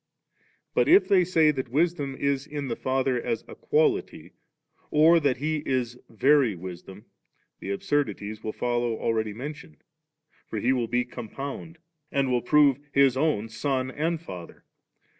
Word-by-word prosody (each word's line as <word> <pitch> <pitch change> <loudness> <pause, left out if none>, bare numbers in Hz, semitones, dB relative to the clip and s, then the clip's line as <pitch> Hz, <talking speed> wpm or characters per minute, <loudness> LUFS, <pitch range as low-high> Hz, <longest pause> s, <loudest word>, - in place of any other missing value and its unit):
But - - +2
if 375 +5 +6
they 195 -3 +5
say 165 -3 +3
that 130 -4 -4
Wisdom 145 -1 0
is 140 0 -1
in 145 -3 -5
the 115 - -2
Father 130 -1 0
as 115 -2 -2
a - - -10
quality 435 -3 0 0.6
or 160 +3 +5
that 140 -5 +1
He 155 +4 -1
is 125 -2 -2
Very 130 0 +3
Wisdom 90 +2 -9
S 105 - -18 0.5
the - - -7
absurdities 105 -1 -2
wQl 110 0 -6
follow 120 -2 -1
already 110 -2 -1
mentioned 135 - -9 0.6
For - - -5
He 130 +2 +2
will 120 -3 -1
be 120 +1 0
compound^, 135 +7 -7 0.4
and 135 -2 +1
will 125 -1 +1
prove 145 +1 +4
His 140 -2 +4
own 135 -7 0
Son 130 +3 -2
and 160 +4 -1
Father^. 90 - -10
130 Hz, 155 wpm, -26 LUFS, 115-150 Hz, 0.6 s, if